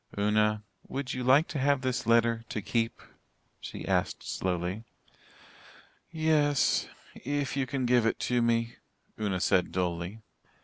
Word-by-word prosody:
"Una, 105 +1 +2 0.2
would 135 -1 -4
you 125 - -3
like 135 +6 +5
to 145 - -3
have 140 0 +2
this 130 -2 -2
letter 115 0 +3
to - - -3
keep?" 115 +3 -2 0.6
she - - -7
asked - - 0
slowly. 90 +3 -2 1.3
"Yes 155 -3 +2 0.3
if 145 +1 -3
you 135 -2 0
can 135 -1 -2
give 120 -2 +3
it - - 0
to 125 -1 +1
me," 115 0 +1 0.4
Una 100 -4 -1
said 90 -1 +2
dully. 90 +4 -3
115 Hz, 135 wpm, -29 LUFS, 105-135 Hz, 1.3 s, like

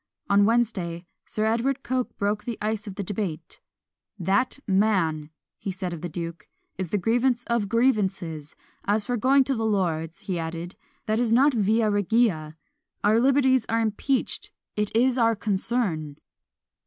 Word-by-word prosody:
On 200 0 +5
Wednesday, 200 -7 0 0.2
Sir 215 - -1
Edward 245 +5 0
Coke 255 -1 -2
broke 205 +1 -1
the 235 -2 -3
ice 215 0 -2
of 195 - -6
debate. 195 -5 -4 0.6
"That 195 +9 +1
man," 190 -7 +1 0.4
said 185 -1 -4
he - - -3
of 160 - -10
the 175 - -4
duke, 170 +1 -6 0.3
"is 185 -3 -4
the 205 - +1
grievance 240 +4 +1
of 235 -5 -1
grievances! 195 - 0 0.3
As 205 +1 +1
for 245 - -1
going 265 +4 +4
to 270 - -1
the 225 -3 -2
lords," 170 -6 -1
he 180 -3 -3
added, 165 +2 -5 0.3
"that 215 +1 +1
is 240 -2 +1
not 270 +5 +5
via 220 0 +2
regia; 205 -7 +1 0.5
our 215 +2 +4
liberties 260 -1 +3
are 230 - +2
impeached 225 +4 -1 0.2
it 210 -1 0
is 250 +2 +3
our 230 -1 +4
concern!" 195 -8 -1
210 Hz, 155 wpm, -25 LUFS, 180-235 Hz, 0.6 s, On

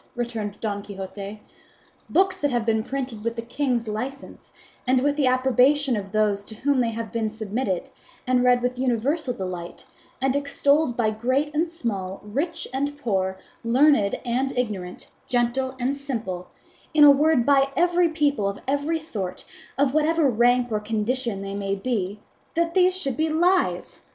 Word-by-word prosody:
returned 225 -4 -4
Don 205 -2 -2
Quixote. 200 +1 -8 0.7
"Books 380 0 +3
that 290 - +1
have 240 -3 0
been 220 -1 +1
printed 255 -4 -4
with 230 0 -2
the 230 - -4
king's 245 -2 -1
licence, 250 +6 -6 0.4
and 255 0 +4
with 285 +2 +1
the 290 -3 +2
approbation 260 +2 +3
of 195 -2 -5
those 210 -1 +1
to 220 - -9
whom 275 +4 +1
they 240 -2 +2
have 230 -1 -5
been 225 -2 -1
submitted, 215 -2 -3 0.4
and 250 -1 +2
read 245 -1 +4
with 250 0 -1
universal 260 +4 0
delight, 185 -6 -6 0.3
and 265 0 +1
extolled 280 -1 +2
by 220 -3 +2
great 260 +7 0
and 320 +3 +1
small, 200 - -4
rich 310 +10 -2
and 285 +2 -2
poor, 190 -8 -1 0.3
learned 240 -3 +3
and 255 +2 -1
ignorant, 200 -7 -3 0.2
gentle 255 +2 0
and 260 +3 0
simple, 225 -11 -4 0.5
in 300 - +7
a 290 - +10
word 285 -3 +3
by 275 -1 +4 0.5
people 285 -9 +1
of 200 - -5
every 285 +4 0
sort, 215 - -5 0.3
of 275 -1 +2
whatever 310 0 +3
rank 245 +1 +3
or 215 - +1
condition 220 0 -2
they 195 0 -5
may 200 -1 -2
be 205 -2 -2 0.4
that 335 0 +1
these 370 0 +4
should 275 -9 -2
be 315 +4 0
lies! 355 +4 +1
245 Hz, 160 wpm, -24 LUFS, 215-285 Hz, 0.7 s, a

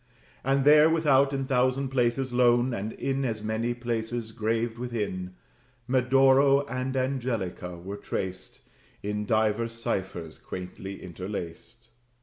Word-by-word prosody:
And 135 +1 +2
there, 150 +1 +7
without, 140 -4 +4
in 135 -1 -2
thousand 130 +1 +1
places 125 0 0
lone, 120 0 +4
And 105 0 -3
in 135 0 -2
as 110 -4 -2
many 110 +2 -1
places 120 -1 -3
graved, 115 +1 -1
within, 100 -7 -3 0.5
Medoro 135 +2 +4
and 130 0 -2
Angelica 120 -9 -2
were 95 +4 -7
traced, 95 -2 -5 0.4
In 105 +1 -2
divers 110 +1 +1
ciphers 95 -7 -4
quaintly 95 +2 -7
interlaced. 95 +5 -7
120 Hz, 120 wpm, -27 LUFS, 105-130 Hz, 0.5 s, there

